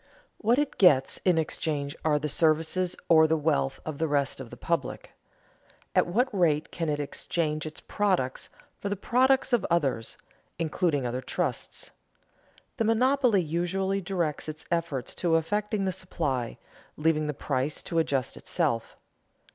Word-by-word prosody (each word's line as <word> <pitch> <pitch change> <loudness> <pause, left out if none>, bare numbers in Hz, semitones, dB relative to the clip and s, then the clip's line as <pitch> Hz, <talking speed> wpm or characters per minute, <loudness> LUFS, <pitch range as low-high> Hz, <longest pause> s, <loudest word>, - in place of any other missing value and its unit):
What 230 +3 +3
it 290 -1 -1
gets 145 -9 +5
in 180 -3 +4
exchange 150 -2 -1
are 150 -2 +3
the 150 +1 -2
services 165 +4 +1
or 160 -1 +6
the 160 +1 +2
wealth 140 -3 0
of 155 -3 -5
the 160 - +1
rest 140 -3 0
of 130 -3 -8
the 120 - -10
public. 165 -4 -2 0.8
At - - +3
what 235 +9 +2
rate 160 -5 +2
can 165 -2 -2
it 145 -1 0
exchange 155 +1 -2
its 155 - -9
products 185 -11 -1 0.3
for 200 - -3
the 200 - 0
products 260 +6 +2
of 240 - +3
others 140 -9 0 0.4
(including 160 -4 0
other 125 +1 -2
trusts)? 150 -3 -3 0.9
The - - +1
monopoly 240 -2 +3
usually 190 +5 -1
directs 175 -5 -2
its 155 0 -8
efforts 165 -7 -1
to 170 -2 +3
affecting 205 +5 0
the 190 - +1
supply, 150 -10 -3 0.4
leaving 155 -1 +1
the 150 - -3
price 135 +2 -2
to 165 -2 0
adjust 135 -5 0
itself. 160 -11 -1
160 Hz, 150 wpm, -28 LUFS, 145-185 Hz, 0.9 s, or